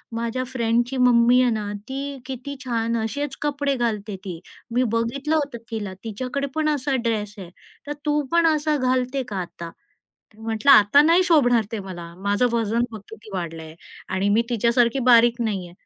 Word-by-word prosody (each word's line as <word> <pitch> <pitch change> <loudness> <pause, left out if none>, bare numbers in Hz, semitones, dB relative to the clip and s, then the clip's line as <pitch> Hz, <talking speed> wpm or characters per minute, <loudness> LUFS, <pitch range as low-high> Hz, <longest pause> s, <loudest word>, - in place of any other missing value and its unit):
माझ्या 235 +2 -2
फ्रेंडची 240 +2 0
मम्मी 240 +1 +5
आहे 250 -1 +3
ना 210 -2 -3 0.2
ती 265 +1 -4 0.3
किती 265 +2 -6
छान 230 -1 -1
असेच 285 +4 -3
कपडे 285 -1 0
घालते 215 -4 -2
ती, 175 -4 -6 0.3
मी 245 +2 +2
बघितलं 275 +7 -1
होतं 285 -5 -1
तिला, 205 -4 -4
तिच्याकडे 255 +6 -3
पण 310 -1 +1
असा 285 -2 0
ड्रेस 210 -2 -2
आहे 185 -3 -9 0.4
तर 295 - -2
तू 295 0 +2
पण 340 -1 +4
असा 305 0 0
घालते 255 0 0
का 195 - -3
आता?" 170 -1 -8 0.4
तर 215 - -30
म्हटलं, 225 +4 +1
"आता 215 +4 +7
नाही 345 +3 +5
शोभणार 245 -7 +4
ते 225 - -2
मला, 170 -2 -8
माझं 205 +5 +3
वजन 230 +1 +1
बघ 220 - -7
किती 220 -1 -12
वाढलंय 165 -2 -6 0.3
आणि 190 +2 0
मी - - +4
तिच्यासारखी 235 +2 +2
बारीक 240 0 +5
नाहीये." 185 -4 -4
235 Hz, 170 wpm, -23 LUFS, 215-270 Hz, 0.4 s, आता